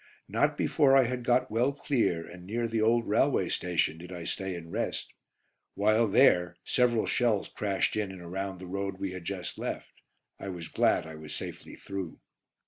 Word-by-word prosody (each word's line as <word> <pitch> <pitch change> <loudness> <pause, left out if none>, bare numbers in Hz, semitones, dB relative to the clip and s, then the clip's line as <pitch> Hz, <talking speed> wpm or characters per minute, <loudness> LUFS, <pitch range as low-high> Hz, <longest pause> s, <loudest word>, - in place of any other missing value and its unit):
Not - - +1
before 135 -3 +4
I 135 - +7
had 125 0 -2
got 125 0 +2
well 120 +5 +2
clear, 125 - 0
and 90 0 -11
near 115 +5 -1
the 115 -1 0
old 115 +1 +3
railway - - +2
station, 85 -2 0
did 90 +2 -10
I 90 -2 -6
stay 95 +2 -3
and 85 -1 -8
rest. - - -3 0.6
While 110 +3 +3
there 90 -3 +4
several 120 -3 +2
shells 115 -5 +1
crashed 100 -2 0
in 105 -3 -1
and 95 - -9
around 95 +2 -4
the 90 - -9
road 95 +1 -3
we 95 -1 -3
had 90 -2 -7
just 90 -2 -5
left. - - -5 0.4
I 100 - -5
was 85 -3 -6
glad - - +2
I 80 - -8
was 75 -1 -7
safely - - -7
through. 95 -4 -6
100 Hz, 185 wpm, -29 LUFS, 90-115 Hz, 0.6 s, I